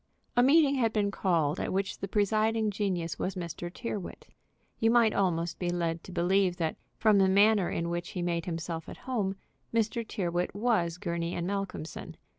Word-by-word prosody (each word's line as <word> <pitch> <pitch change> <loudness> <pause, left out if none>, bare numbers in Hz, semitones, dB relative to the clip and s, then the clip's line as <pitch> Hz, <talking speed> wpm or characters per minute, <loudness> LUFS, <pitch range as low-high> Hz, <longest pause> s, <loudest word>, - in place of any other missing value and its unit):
A 245 - +5
meeting 280 +2 +5
had 230 -3 +2
been 205 -2 +1
called 170 -6 +1
at - - -2
which 195 +1 -2
the 195 - -3
presiding 215 +2 +1
genius 185 -5 -2
was 190 - -2
Mr. 175 -1 -5
Tyrrwhit. 205 -2 -6 0.5
You 225 - +3
might 230 -2 +4
almost 170 -3 0
be 175 - -1
led 170 -1 -1
to - - -9
believe 180 +1 +2
that, 160 -2 -1 0.2
from 215 -2 +4
the 190 -1 +4
manner 200 -1 +4
in 170 - -2
which 175 0 -3
he 180 - -4
made 170 -1 -1
himself 165 -1 -4
at - - -8
home, 210 -7 -1 0.4
Mr. 230 +1 0
Tyrrwhit 180 -5 -2
was 205 -7 +1
Gurney 170 -2 -3
& - - -2
Malcolmson. 195 -4 -4
190 Hz, 180 wpm, -29 LUFS, 170-215 Hz, 0.5 s, A